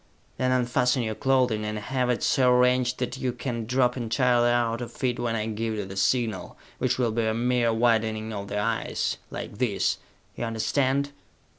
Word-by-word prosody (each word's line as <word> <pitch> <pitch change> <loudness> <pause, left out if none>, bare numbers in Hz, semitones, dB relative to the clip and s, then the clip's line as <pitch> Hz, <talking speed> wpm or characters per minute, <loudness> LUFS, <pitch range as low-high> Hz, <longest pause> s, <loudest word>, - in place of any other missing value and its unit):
Then 130 0 +1
unfasten 125 0 +2
your 110 -1 -2
clothing, 125 -3 +1
and 105 0 -3
have 125 +4 -1
it 125 - 0
so 130 -2 +4
arranged 125 0 +3
that 125 +1 -3
you 130 - 0
can 120 -3 -4
drop 125 0 +2
entirely 120 0 +2
out 120 -1 +1
of 120 - -8
it 125 -1 +1
when 120 -1 -1
I 110 -1 -1
give 110 0 -2
you 105 -2 -3
the 95 0 -8
signal, 110 +1 0 0.2
which 130 0 +1
will 120 -3 +1
be 110 0 0
a 110 - 0
mere 120 0 +2
widening 110 -1 +1
of 100 -1 -5
the 105 - -3
eyes, 110 +2 -1
like - - -7
this! - - +1 0.4
You 120 - -3
understand? 135 +5 0
120 Hz, 185 wpm, -26 LUFS, 110-125 Hz, 0.4 s, so